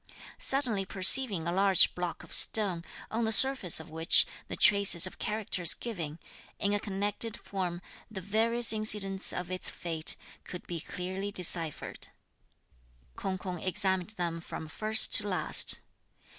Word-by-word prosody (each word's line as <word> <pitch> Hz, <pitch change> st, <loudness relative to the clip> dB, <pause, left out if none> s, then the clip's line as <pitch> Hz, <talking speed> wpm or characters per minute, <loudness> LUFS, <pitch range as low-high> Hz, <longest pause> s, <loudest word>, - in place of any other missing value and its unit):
Suddenly 250 Hz, -8 st, +3 dB
perceiving 190 Hz, -1 st, 0 dB
a -, -, -2 dB
large 195 Hz, +1 st, +3 dB
block 175 Hz, -2 st, -6 dB
of -, -, -12 dB
stone, 190 Hz, -6 st, +3 dB, 0.3 s
on 230 Hz, +1 st, -3 dB
the 220 Hz, -, -2 dB
surface 260 Hz, -8 st, +6 dB
of 160 Hz, 0 st, -13 dB
which 160 Hz, +2 st, +4 dB, 0.2 s
the -, -, -6 dB
traces 200 Hz, -4 st, +4 dB
of 185 Hz, -, -8 dB
characters 210 Hz, -5 st, -1 dB
giving, 165 Hz, -10 st, -7 dB, 0.4 s
in 200 Hz, 0 st, -2 dB
a 205 Hz, -, 0 dB
connected 205 Hz, +2 st, -1 dB
form, 180 Hz, -3 st, -6 dB, 0.3 s
the 210 Hz, -3 st, -8 dB
various 225 Hz, +5 st, 0 dB
incidents 210 Hz, -3 st, +1 dB
of 180 Hz, 0 st, -6 dB
its 185 Hz, -, -6 dB
fate, 165 Hz, -2 st, 0 dB, 0.3 s
could 180 Hz, -, -10 dB
be 170 Hz, -1 st, -6 dB
clearly 185 Hz, +5 st, -7 dB
deciphered, 170 Hz, -4 st, -1 dB, 1.1 s
K'ung 190 Hz, -1 st, -5 dB
K'ung 180 Hz, -2 st, -8 dB
examined 190 Hz, +2 st, -1 dB
them 170 Hz, -2 st, -4 dB
from 160 Hz, -, -9 dB
first 215 Hz, +7 st, +2 dB
to 205 Hz, -, +3 dB
last. 185 Hz, -2 st, +3 dB
190 Hz, 145 wpm, -28 LUFS, 175-215 Hz, 1.1 s, surface